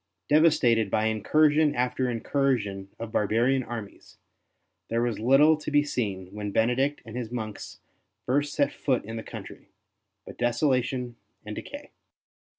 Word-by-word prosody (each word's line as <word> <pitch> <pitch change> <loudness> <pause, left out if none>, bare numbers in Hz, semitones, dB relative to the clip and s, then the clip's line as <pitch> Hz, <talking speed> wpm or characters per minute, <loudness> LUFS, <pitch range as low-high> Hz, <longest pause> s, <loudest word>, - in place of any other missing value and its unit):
Devastated 125 -9 +4
by 110 +2 +1
incursion 150 +8 +3
after 125 +1 0
incursion 115 -6 -1
of 115 -1 -6
barbarian 120 +6 +2
armies, 115 -4 -9 0.7
there 115 +1 0
was 120 -3 -1
little 135 +7 +5
to 155 - -6
be 145 0 +3
seen, 100 -9 -3
when 105 0 -4
Benedict 125 +7 +1
and 115 0 -9
his 120 -2 -4
monks 110 -4 -6 0.4
first 145 +3 0
set 140 -1 +1
foot 130 -6 -1
in 110 +2 -6
the 115 - -4
country, - - -10 0.6
but - - -11
desolation 125 0 0 0.3
and 105 0 -6
decay. 285 0 -9
120 Hz, 140 wpm, -27 LUFS, 110-140 Hz, 0.7 s, little